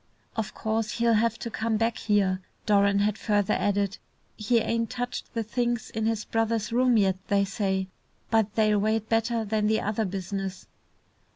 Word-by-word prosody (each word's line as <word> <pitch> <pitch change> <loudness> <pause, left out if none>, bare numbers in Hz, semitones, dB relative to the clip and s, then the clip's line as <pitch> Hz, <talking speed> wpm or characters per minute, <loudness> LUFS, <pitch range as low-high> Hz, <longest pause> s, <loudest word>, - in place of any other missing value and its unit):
"Of 220 -3 -3
course 220 0 -1
he'll 235 0 +2
have 230 +1 +2
to 230 - -6
come 220 0 0
back 225 +1 +1
here," 195 -3 +1 0.2
Doran 200 -1 +4
had 210 +1 +1
further 205 -3 +1
added. 200 -1 0 0.4
"He 220 +2 +1
ain't 230 0 0
touched 245 0 -4
the 230 - 0
things 240 +1 -2
in 220 0 -1
his 225 -2 -1
brother's 225 -1 -1
rooms 245 -2 +4
yet, 190 -1 +2
they 200 -2 +2
say. 195 -2 -1 0.5
But 220 -2 +2
they'll 215 -2 +3
wait 220 +1 0
better 225 0 +1
than 210 0 0
the 220 0 +2
other 215 +1 -1
business." 195 0 -4
215 Hz, 170 wpm, -27 LUFS, 200-225 Hz, 0.5 s, Doran